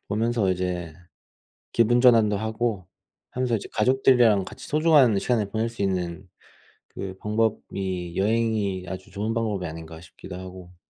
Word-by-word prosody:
보면서 110 -1 +1
이제 90 -3 -3 0.8
기분 120 +1 +3
전환도 115 -5 +5
하고 110 -3 -2 0.4
하면서 125 -2 0
이제 105 - -5
가족들이랑 120 -4 +4
같이 - - -10
소중한 150 -8 +4
시간을 105 -2 0
보낼 110 +2 -1
수 115 -3 -8
있는 90 -1 -2 0.6
그 95 -1 -7
방법이 100 -5 -2
'여행이 105 -3 0
아주 95 0 -8
좋은 105 +3 -2
방법이 110 -5 -2
아닌가.' 80 0 -9
싶기도 90 +1 -11
하고. 90 -1 -11
105 Hz, 315 characters per minute, -25 LUFS, 95-115 Hz, 0.8 s, 전환도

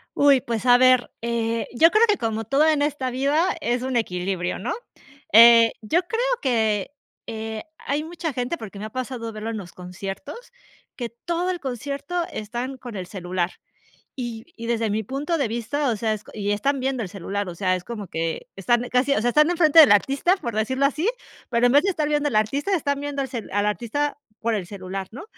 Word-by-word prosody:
Uy, 280 -3 +5
pues 230 0 -3
a 245 0 +7
ver, 255 -1 +4
eh, 230 -1 -1
yo 325 +7 +6
creo 435 +4 +5
que 420 -2 +2
como 225 -1 -2
todo 280 +8 +3
en 305 -2 +3
esta 290 -3 -1
vida 290 +8 +1
es 240 +1 0
un 260 -1 -3
equilibrio, 180 -4 -1
¿no? 230 - -2 0.6
Eh, 230 0 +8
yo 320 - +1
creo 455 +5 -2 0.2
que, 220 -3 +1 0.4
eh, 220 -1 -5
hay 290 0 -2
mucha 325 -1 -4
gente, 250 +7 -2
porque 205 -2 -9
me 210 - -5
ha 215 - -6
pasado 250 -2 -5
verlo 215 +1 -5
en 220 - -4
los 180 -4 -8
conciertos, 195 - -8 0.5
que 240 -2 -3 0.2
todo 345 +1 -1
el 360 -2 -3
concierto 280 +6 -3
están 240 +5 -4
con 245 -3 -9
el 180 -1 -5
celular. 180 -2 -2 0.6
Y 235 -3 -5
y 230 0 -7
desde 230 -2 0
mi 215 +2 0
punto 285 - -2
de 275 -6 0
vista, 240 +6 -2
o 225 - -1
sea, 220 +1 0
es, 210 - -4
y 205 -1 -1
están 275 +7 0
viendo 260 -2 -1
el 195 - -5
celular, 195 +1 -4
o 175 - -6
sea, 185 -1 +1
es 180 - -3
como 210 0 -6
que 165 0 -3
están 240 +5 +1
casi, 255 +3 +2
o 215 - +1
sea, 245 +2 +2
están 300 +5 +4
enfrente 325 -2 +6
del 295 - +8
artista, 275 - +3
por 240 - -5
decirlo 260 +6 0
así, 305 +8 0 0.4
pero, 240 0 +3
en 245 - +3
vez 285 - +6
de 395 - +1
estar 310 -5 -1
viendo 295 -1 +1
al 225 - -1
artista, 280 - +1
están 285 -2 -1
viendo 285 -1 -3
el 265 - -4
cel 235 -4 -6
al 205 +1 +1
artista 245 +8 -1 0.2
por 230 0 0
el 190 -4 -3
celular, 190 0 -6
¿no? 270 - -8
240 Hz, 215 wpm, -23 LUFS, 215-285 Hz, 0.6 s, Eh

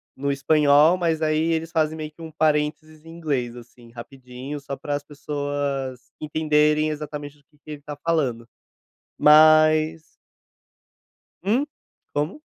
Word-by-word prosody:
no 140 +1 -2
espanhol, 145 +3 +4
mas 165 -3 -1
aí 155 0 +1
eles 165 0 -2
fazem 155 -1 0
meio 155 -1 -6
que 160 +1 -11
parênteses 155 0 -1
em 165 - -14
inglês, 140 -8 -3
assim, 120 0 -15
rapidinho, 125 +3 -9
só 140 0 -6
para 145 - -4
as 145 0 -3
pessoas 145 -2 -4 0.2
entenderem, 150 0 +2
exatamente, 150 -1 -7
o - - -30
que 150 - -29
que 150 +1 -13
ele 150 -1 -8
tá 145 0 -8
falando. 130 -9 0 0.7
Mas 155 +1 +5 1.4
Hum? 240 +9 +1 0.5
Como? 150 - -3
150 Hz, 135 wpm, -23 LUFS, 140-155 Hz, 1.4 s, Mas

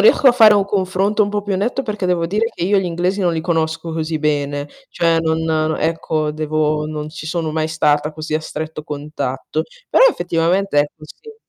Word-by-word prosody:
riesco 260 +6 +6
a - - +6
fare 220 -3 +7
un 200 -1 +3
confronto 195 +2 +1
un - - -3
po' 205 0 -1
più 200 -1 -2
netto 240 +7 -1
perché 210 -5 -3
devo 175 -2 +1
dire 210 +5 0
che - - -5
io 200 +2 +3
gli 190 - 0
inglesi 180 +3 -1
non 175 -3 +2
li 160 - -1
conosco 160 -1 -1
così 160 0 -2
bene. 145 -1 -1 0.2
Cioè 165 -1 +2
non 160 0 0
n 155 -1 0
ecco, 160 -1 -1
devo 155 0 -1
non 155 -1 -5
ci 155 0 -8
sono 165 -1 -2
mai 155 0 -1
stata 150 -1 +1
così 155 0 -5
a 155 - +1
stretto 155 0 -6
contatto. 145 -3 -4 0.3
Però - - +6
effettivamente 175 - 0
è 145 - +4
così. 160 - -13
160 Hz, 205 wpm, -19 LUFS, 155-190 Hz, 0.3 s, fare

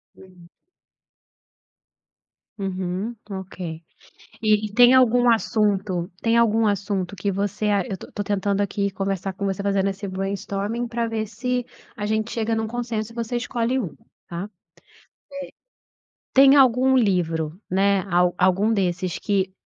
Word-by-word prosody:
Hum. 180 -2 -17 2.1
Uhum, 190 +3 -3 0.2
ok. 180 -4 -6 0.6
E 215 0 +3
e 205 - -10
tem 245 +3 +7
algum 245 -1 +5
assunto 200 -5 +1
tem 230 0 +3
algum 225 -1 +3
assunto 200 -1 -1
que 200 +1 -2
você 205 +2 -1
ah, 200 -2 +2
eu 190 - -5
tô - - -11
tô 205 - -3
tentando 200 0 0
aqui 200 0 -1
conversar 195 -1 -3
com 200 - -5
você, 195 0 -1
fazendo 195 -1 +1
esse 195 +1 -6
brainstorming 200 +4 -3
para 235 0 -1
ver 220 -1 -2
se 245 +3 -2 0.3
a 210 -1 -3
gente 220 +1 -1
chega 225 0 0
num 220 0 -1
consenso 230 -1 -3
e - - -17
você 235 +1 -3
escolhe 240 +1 -1
um, 190 -11 -4 0.3
tá? 175 +2 -4
Eh, - - -8 1.9
tem 270 +1 +7
algum 260 0 +5
livro, 170 -6 0
né, 195 +1 +3
a 180 0 +4
algum 190 +4 +3
desses 180 -3 -1
que 190 -2 0
205 Hz, 145 wpm, -23 LUFS, 190-230 Hz, 2.1 s, tem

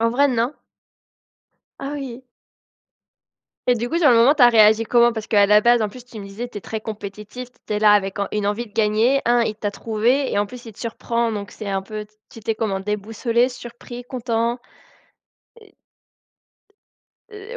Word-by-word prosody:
En 230 - +3
vrai, 280 +4 +3
non? 245 +3 0 1.3
Ah 275 +1 -4
oui! 260 -3 -7 1.4
Et 245 - +4
du 240 +1 -3
coup, 335 - +1
sur 310 -4 +5
le 235 - +5
moment, 250 +6 +6
tu 280 - +2
as 240 - +9
réagi 220 -1 +5
comment? 240 0 +4
Parce 220 -1 -5
qu'à 205 -2 +4
la 210 +1 +6
base, 235 0 +4
en 210 - 0
plus, 245 +4 -12
tu 235 -3 -11
me 200 - -7
disais, 215 +5 -6
tu 210 - -7
es - - -12
très 220 +2 -5
compétitif, 210 +3 -8 0.2
tu - - -4
es - - 0
là 210 -1 +6
avec 195 -1 +1
en 200 - 0
une 210 -1 -1
envie 220 +4 -2
de 205 - -20
gagner, 225 +5 +2
1: 240 0 +4
il 215 -2 -1
t'a 205 -1 -3
trouvé 230 +6 0
et 205 - +1
en 205 - +1
plus 245 +3 -11
il 225 - -10
te - - -23
surprend, 235 0 -2
donc 205 -1 -5
c'est 215 - -8
un 195 -1 -1
peu 210 +1 -7 0.2
tu - - -12
étais 225 0 -2
comment? 205 -4 -2
Déboussolé? 225 +4 0
Surpris? 240 0 -10
Content? 235 -1 -2 2.7
Et 425 +3 -9
230 Hz, 200 wpm, -21 LUFS, 210-245 Hz, 2.7 s, as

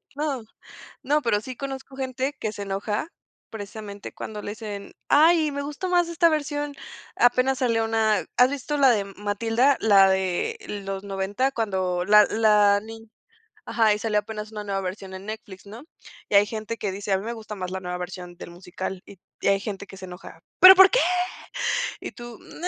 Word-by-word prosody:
No, 285 -5 -2 0.6
no, 295 +3 +1
pero 210 -4 +1
sí 255 +2 -8
conozco 270 -1 -7
gente 265 +1 -3
que 215 -1 -3
se 205 - -9
enoja, 200 +7 -3 0.4
precisamente, 205 -1 -8
cuando 210 -1 -7
le - - -5
dicen: 205 -2 -7 0.2
"Ay, 315 +1 +5
me 285 0 -4
gustó 295 +6 -5
más 350 -1 +3
esta 335 0 +4
versión". 295 -2 -2 0.4
Apenas 255 +2 +3
salió 230 -3 +1
una, 220 -3 +1
¿has 250 +1 +5
visto 285 +1 -3
la 270 -2 +5
de 205 -4 +2
Matilda?, 225 +7 +1
la 195 -3 +6
de 190 - -1 0.3
los 195 0 -4
90 200 +6 -1
cuando 190 -7 -1
la 210 +1 +7
la 210 -2 +4
ni 225 0 -11 0.6
ajá, 220 -2 +2
y 210 - -4
salió 215 -1 0
apenas 215 0 -6
una 210 -1 -6
nueva 195 -1 -2
versión 190 +1 -6
en 190 +1 -8
Netflix, 215 -3 -8
¿no? 220 +7 -11 0.4
Y - - -3
hay 200 - +7
gente 215 +1 -5
que 205 -4 -3
dice: 200 +1 -4
"A 190 - +3
mí 195 - -7
me 235 - -3
gusta 220 -2 -8
más 185 -2 -5
la 190 - -4
nueva 180 -1 -4
versión 180 0 -7
del 175 - -10
musical", 185 +1 -6
y 195 - -14 0.2
y - - 0
hay 195 0 +3
gente 200 -2 -6
que 195 - -12
se 190 - -10
enoja: 180 0 -11 0.2
"Pero, 375 +1 +12
¿por 380 0 +9
qué?" - - +3 1.0
y - - -7
tú: 240 -2 -10
"No". 355 - -6
215 Hz, 195 wpm, -24 LUFS, 195-260 Hz, 1.0 s, Pero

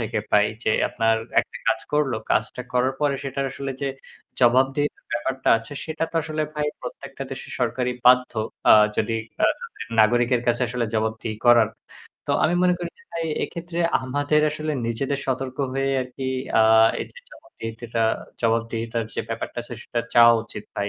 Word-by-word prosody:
থেকে 110 -1 -2
পাই? 105 0 +5 0.2
যে - - +2 0.2
আপনার 115 0 +2 0.2
একটা - - -10
কাজ 110 0 +2
করল, 150 -3 +2 0.2
কাজটা 120 +3 0
করার 125 +1 +2
পরে 145 -2 +2
সেটার 135 0 -2
আসলে 140 0 -5
যে 140 - 0 0.5
জবাবদিহিতার 135 +4 +2
ব্যাপারটা 130 +3 -2
আছে 115 +4 -11
সেটা 160 0 -2
তো - - -28
আসলে 155 0 -2
ভাই 150 0 -1
প্রত্যেকটা 135 +2 -8
দেশের 135 - -7
সরকারই 125 +1 0
বাধ্য। 125 0 +5 0.4
আ - - +11 0.2
যদি 110 +1 0 0.3
আ - - +7 0.5
নাগরিকের 120 +2 +3
কাছে 120 +1 +2
আসলে 120 +1 -1
জবাবদিহি 110 0 -2
করার। 120 -2 +6 0.6
তো - - -2
আমি 170 +3 +2
মনে 180 0 +4
করি 175 -1 -4
যে - - -19
ভাই 165 0 -2 0.2
এক্ষেত্রে 170 0 -6 0.2
আমাদের 145 +4 +1
আসলে 155 0 -3
নিজেদের 135 +4 -2
সতর্ক 130 0 -2 0.2
হয়ে 135 0 0
আরকি 130 +1 -5 0.3
আ - - +7 0.4
এইযে - - -8
জবাবদিহিতিটা 115 - -5 0.4
জবাবদিহিতার 115 0 -1
যে - - -1
ব্যাপারটা - - -5
আছে - - -8
সেটা 120 - -2
চাওয়া 115 0 +8
উচিত 110 -2 -9
ভাই। 100 0 -1
125 Hz, 160 wpm, -23 LUFS, 115-140 Hz, 0.6 s, আ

